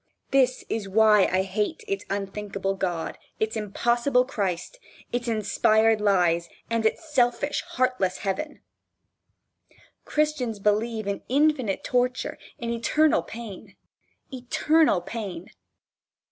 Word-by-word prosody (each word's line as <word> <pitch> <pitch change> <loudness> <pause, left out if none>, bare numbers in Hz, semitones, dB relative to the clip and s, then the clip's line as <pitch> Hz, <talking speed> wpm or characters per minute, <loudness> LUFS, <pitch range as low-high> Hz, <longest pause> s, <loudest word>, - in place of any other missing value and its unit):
This 260 -2 +2
is 210 -3 -3
why 210 0 +5
I 185 +1 +2
hate 210 - -2
its 395 -1 -3
unthinkable 200 0 -3
God, 175 -4 -3 0.2
its 220 +1 -1
impossible 240 +4 +1
Christ, 200 - -3 0.3
its 245 0 -1
inspired 220 0 +3
lies, 175 -4 +2 0.2
and 230 -1 +3
its 315 +6 -5
selfish, 245 +2 +2
heartless 255 -7 +1
heaven. 205 +11 -4 1.4
Christians 300 -7 0
believe 215 +2 0
in 200 0 -3
infinite 275 -6 +2
torture, 250 0 0 0.2
in 235 0 -3
eternal 300 +7 +2
pain. 225 -5 -9 0.6
Eternal 260 - +2
Pain! 190 -3 -6
225 Hz, 105 wpm, -25 LUFS, 195-255 Hz, 1.4 s, why